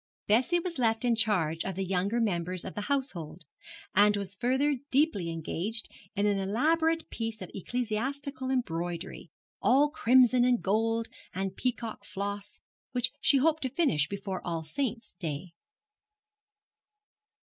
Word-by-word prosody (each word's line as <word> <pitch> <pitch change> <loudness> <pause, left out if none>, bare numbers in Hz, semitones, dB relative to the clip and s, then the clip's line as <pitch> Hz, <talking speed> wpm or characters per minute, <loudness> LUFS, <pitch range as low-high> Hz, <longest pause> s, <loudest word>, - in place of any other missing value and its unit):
Bessie 245 +11 +3
was 340 -4 -4
left 225 0 +2
in 240 -1 +3
charge 180 -8 +1
of 190 -1 -3
the 195 +1 -2
younger 195 +5 0
members 180 -4 -1
of - - -5
the 210 - -4
household, 185 - -2 0.5
and 205 +1 +5
was 200 -1 -3
further 265 +6 +1
deeply 260 - +2
engaged 170 +7 -3 0.3
in 200 +1 +1
an 205 -1 +2
elaborate 320 +11 +1
piece 225 -1 -3
of - - -8
ecclesiastical 260 - -3
embroidery, 175 -8 -3 0.3
all 285 +4 +4
crimson 250 -3 +5
and 245 -1 +3
gold, 225 +3 +1 0.3
and 190 0 -2
peacock 240 -3 -3
floss, 200 0 -5 0.3
which 245 0 +1
she 280 - +5
hoped 315 +3 +3
to 260 - -1
finish 240 - +2
before 195 -1 -4
All 165 -2 -2
Saints' 230 - -3
Day. 165 +1 -4
220 Hz, 140 wpm, -30 LUFS, 190-255 Hz, 0.5 s, and